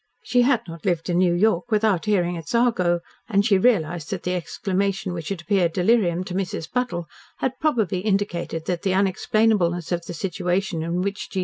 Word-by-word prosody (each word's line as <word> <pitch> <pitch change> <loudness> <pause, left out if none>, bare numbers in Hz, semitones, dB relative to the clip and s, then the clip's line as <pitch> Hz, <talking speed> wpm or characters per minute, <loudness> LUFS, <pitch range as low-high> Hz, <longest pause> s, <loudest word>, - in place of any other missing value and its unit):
She 245 - +2
had 245 -2 +3
not 165 -2 -9
lived 175 -1 0
in 175 - +2
New 180 -2 +3
York 210 +2 +2
without 210 -5 +2
hearing 180 -4 +1
its 165 +3 -5
argot, 185 -8 +2 0.3
and 200 -2 +2
she 200 -4 +4
realised 175 -8 +1
that - - -4
the 180 - -1
exclamation 190 +1 -2
which 165 -3 -5
had 195 -5 -3
appeared 175 -3 +1
delirium 185 -3 +2
to 185 - -7
Mrs. 180 -4 -3
Buttle 240 -9 -1 0.3
had 260 0 -2
probably 220 - +1
indicated 185 -5 -1
that 175 -1 -2
the 190 -1 0
unexplainableness 190 -2 +1
of 170 -1 -2
the 175 - -5
situation 180 +1 -1
in 170 +3 -1
which 200 0 -4
G. 190 - -3
185 Hz, 190 wpm, -23 LUFS, 175-210 Hz, 0.3 s, she